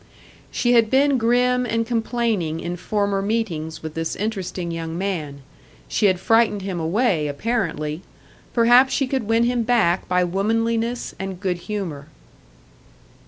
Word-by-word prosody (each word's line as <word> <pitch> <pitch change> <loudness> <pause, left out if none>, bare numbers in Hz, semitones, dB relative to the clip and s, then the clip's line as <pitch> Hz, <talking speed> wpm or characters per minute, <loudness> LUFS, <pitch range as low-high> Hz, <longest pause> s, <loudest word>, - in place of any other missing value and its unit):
She 245 0 +1
had 230 -2 +4
been 275 +1 +3
grim 250 +2 +2
and 230 -1 -1
complaining 225 -8 -1
in 175 +1 -4
former 200 +1 -1
meetings 170 -8 -2
with 160 -1 -5
this 165 0 -3
interesting 190 -4 -3
young 165 0 -4
man; 155 -8 -4 0.4
she 210 - +2
had 185 -2 +2
frightened 225 -1 +2
him 190 -3 -3
away, 165 -2 +1
apparently; 155 -2 -2 0.5
perhaps 245 +3 +5
she 275 - +1
could 255 -4 -2
win 225 +1 +3
him 240 0 +1
back 220 -7 +2
by 180 0 +2
womanliness 225 +6 -1
and 190 -1 -5
good 185 -3 -1
humour. 175 -8 -5
205 Hz, 140 wpm, -22 LUFS, 170-235 Hz, 0.5 s, perhaps